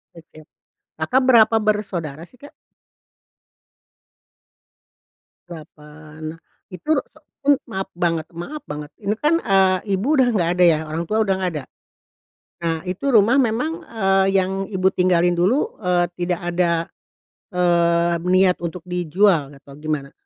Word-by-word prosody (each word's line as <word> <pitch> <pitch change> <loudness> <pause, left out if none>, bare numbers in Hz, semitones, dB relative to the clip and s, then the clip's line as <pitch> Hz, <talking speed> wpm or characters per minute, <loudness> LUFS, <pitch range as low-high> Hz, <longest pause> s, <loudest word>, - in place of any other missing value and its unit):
Oh, 165 - -13
siap. 155 -1 -17 0.5
Kakak 260 +1 +2
berapa 230 -3 +5
bersaudara 200 -9 -2
sih 250 - -22
Kak? 285 +4 -14 3.0
8, 155 -1 -10 0.3
itu 180 - -10 0.5
itu 280 - -2 0.2
maaf 190 -2 -3
banget 165 -2 -1
maaf 290 - -7
banget 150 0 -7
ini 210 0 -1
kan, 300 +8 +1
eee, 190 - +3 0.2
ibu 270 +10 +1
udah 255 - +5
nggak 170 -4 +1
ada - - +6
ya 160 -2 +4
orang 155 +2 -3
tua 220 +3 +1
udah 195 -2 +1
nggak 185 -1 -1
ada? 140 - -7 1.0
Nah 165 -1 -1
itu 180 +8 -5
rumah 225 +5 +5
memang, 250 +5 +1
eee, 195 -4 +1
yang 190 +1 -1
ibu 190 -2 +1
tinggalin 175 -1 +2
dulu, 205 +11 +1
eee, 180 -3 +1
tidak 175 0 -1
ada, 175 0 0 0.9
eee, 170 -1 +2
niat 185 0 +3
untuk 170 0 -6
dijual 180 -3 +1
atau 140 0 -16
gimana? 150 -3 -3
180 Hz, 135 wpm, -21 LUFS, 165-210 Hz, 3.0 s, ada